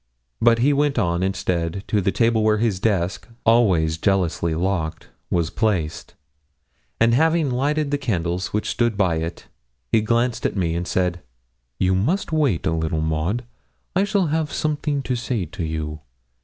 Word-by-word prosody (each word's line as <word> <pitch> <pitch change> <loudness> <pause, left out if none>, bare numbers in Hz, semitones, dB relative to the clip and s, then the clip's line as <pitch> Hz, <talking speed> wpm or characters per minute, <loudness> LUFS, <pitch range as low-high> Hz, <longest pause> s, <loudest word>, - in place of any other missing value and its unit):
But 115 0 +5
he 135 +5 +3
went 145 -1 +1
on, 85 -5 +1
instead, 90 -1 -1
to 105 - +2
the 95 - +1
table 115 0 +2
where 110 0 +3
his 105 -4 0
desk, 95 -3 0 0.2
always 90 -9 +3
jealously 85 -4 +1
locked, 85 -2 -2 0.2
was 85 -1 0
placed, 95 -9 -1 0.8
and 115 +1 +4
having 160 +1 +3
lighted 145 +3 0
the 145 - 0
candles 90 -8 -1
which 105 - -2
stood 120 -3 0
by 90 -5 +2
it, 80 +1 -5 0.5
he 110 - +4
glanced 115 +2 0
at - - 0
me, 85 -3 0
and 85 +1 -3
said 90 -1 0 0.6
'You 95 +5 +2
must 145 - 0
wait 145 - +1
a - - +2
little, 80 -1 -1
Maud; 80 +9 -1 0.5
I 190 - +4
shall 200 -2 +1
have 160 -2 0
something 150 -2 -1
to 130 - -1
say 120 -5 -2
to 85 +2 -6
you. 80 -1 -4
100 Hz, 165 wpm, -22 LUFS, 85-125 Hz, 0.8 s, But